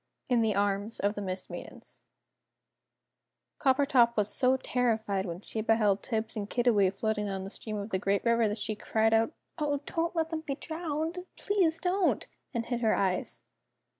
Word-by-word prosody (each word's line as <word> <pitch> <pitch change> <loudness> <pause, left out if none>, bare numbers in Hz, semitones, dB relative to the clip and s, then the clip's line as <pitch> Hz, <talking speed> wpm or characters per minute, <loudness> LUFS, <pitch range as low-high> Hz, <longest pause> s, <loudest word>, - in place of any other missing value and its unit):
IN 245 -2 +4
THE 220 -3 +2
ARMS 205 +2 0
OF 205 +1 +1
THE 205 - -5
MIST 185 -1 -5
MAIDENS - - -9 1.6
Coppertop 260 -4 +4
was 210 0 +1
so 260 0 +4
terrified 220 -7 0
when 170 +1 -5
she 220 - -4
beheld 210 -3 +3
Tibbs 220 -2 -2
and 205 -1 -4
Kiddiwee 230 -6 +3
floating 210 +2 -1
down 195 -1 -3
the 195 - -7
stream 215 -1 -5
of 205 +2 -5
the 190 - +1
great 200 +2 0
river 235 -1 +4
that 210 +1 -2
she 215 0 -2
cried 220 +1 +1
out 225 0 +3 0.3
"Oh, 290 -2 0
don't 335 +1 -1
let 325 0 0
them 320 -1 -2
be 290 -3 -3
drowned! 325 +3 -4
Please 365 -6 +2
don't!" 370 +1 +1 0.3
and 235 -3 -2
hid 240 -1 -2
her 220 -2 +3
eyes. 185 -2 0
225 Hz, 175 wpm, -30 LUFS, 205-275 Hz, 1.6 s, IN